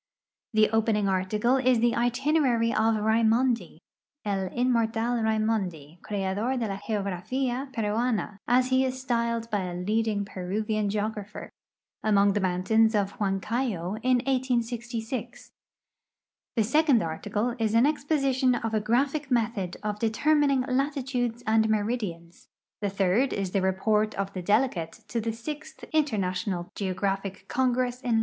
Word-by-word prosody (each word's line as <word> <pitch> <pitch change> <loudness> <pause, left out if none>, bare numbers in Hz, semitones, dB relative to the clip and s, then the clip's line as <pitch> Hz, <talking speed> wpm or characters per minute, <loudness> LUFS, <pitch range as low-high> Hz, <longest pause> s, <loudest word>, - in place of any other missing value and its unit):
The 215 0 +5
oi)ening 220 -2 +2
article 210 +7 +1
is 255 -2 +3
the 235 0 +3
itinerary 245 -1 +2
of 220 0 +2
Raimondi 225 +3 +2 0.2
— - - -67
" 290 - -48
El 195 -2 -1
inmortal 235 0 +1
liaimondi, 205 -8 -1
creador 205 +5 -2
de 230 - -1
la 195 -1 -3
Geografia 240 +6 -2
Peruana," 220 -2 -1
as 250 +1 +3
he 260 0 +3
is 260 0 -2
styled 235 -2 -1
hy 205 - +1
a 180 -1 -4
leading 210 +2 0
Peruvian 205 +3 -2
geograitlier 210 0 -4 0.3
— - - -53
among 200 -2 +4
the 205 - +1
mountains 205 +5 +2
of 200 -1 0
Iluancayo 205 -1 -1
in 250 0 +3
I86(i; 245 -2 -2 1.0
the 225 - +3
second 275 - +3
article 210 +8 -2
is 220 -1 +1
an 230 +3 +6
exposition 275 -4 +1
of 225 -1 -3
a 215 - +1
graphic 270 +6 0
method 225 -7 0
of 210 0 -3
determining 275 +5 +2
latitudes 255 -3 -1
and 220 0 +3
meridians; 205 -6 -3 0.3
the 205 - 0
third 195 +7 +1
is 195 -2 -2
the 195 - +1
rej)ort 210 +3 +1
of 195 0 -3
the 185 - -4
delegate 205 -3 +1 0.2
to 235 - -1
the 225 +1 -1
sixth 300 +7 -7
Interna 225 -12 +1
tional 180 -1 -4
Geographic 195 0 -2
Congress 250 -1 0
in 245 -3 0
I. - - +4
225 Hz, 140 wpm, -27 LUFS, 200-250 Hz, 1.0 s, an